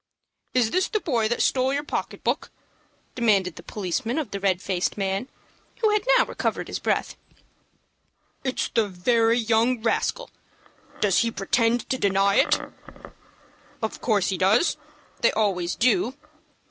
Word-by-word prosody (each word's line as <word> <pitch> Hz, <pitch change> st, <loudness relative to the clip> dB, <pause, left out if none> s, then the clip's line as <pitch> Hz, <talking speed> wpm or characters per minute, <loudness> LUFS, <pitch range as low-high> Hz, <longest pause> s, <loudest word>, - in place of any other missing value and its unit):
"Is 240 Hz, -3 st, +3 dB
this 370 Hz, +1 st, +1 dB
the 430 Hz, -, -1 dB
boy 240 Hz, -, 0 dB
that 240 Hz, -, 0 dB
stole 260 Hz, 0 st, +2 dB
your 285 Hz, +1 st, -1 dB
pocket -, -, -4 dB
book?" -, -, -1 dB, 0.6 s
demanded 200 Hz, -8 st, +1 dB
the -, -, -10 dB
policeman 215 Hz, -, -3 dB
of 295 Hz, -9 st, -3 dB
the 200 Hz, -, -4 dB
red 190 Hz, -2 st, +1 dB
faced 185 Hz, 0 st, -2 dB
man, 195 Hz, +4 st, -1 dB, 0.5 s
who 435 Hz, -2 st, +3 dB
had 425 Hz, -1 st, +2 dB, 0.2 s
now -, -, +4 dB
recovered -, -, -3 dB
his -, -, -3 dB
breath. -, -, -1 dB, 1.3 s
"It's 260 Hz, -1 st, -1 dB
the 225 Hz, -3 st, +1 dB
very 225 Hz, +5 st, +2 dB
young 230 Hz, +1 st, +2 dB
rascal. -, -, -1 dB, 0.7 s
Does 200 Hz, -3 st, +3 dB
he 230 Hz, -, +2 dB
pretend 230 Hz, +3 st, 0 dB
to 260 Hz, -, 0 dB
deny 195 Hz, 0 st, +2 dB
it?" -, -, +4 dB, 1.2 s
"Of 220 Hz, -, -3 dB
course 205 Hz, -6 st, +1 dB
he 190 Hz, -, -2 dB
does. 205 Hz, -, +3 dB, 0.4 s
They -, -, +3 dB
always 185 Hz, -5 st, 0 dB
do." 255 Hz, +2 st, +2 dB
225 Hz, 145 wpm, -24 LUFS, 195-255 Hz, 1.3 s, now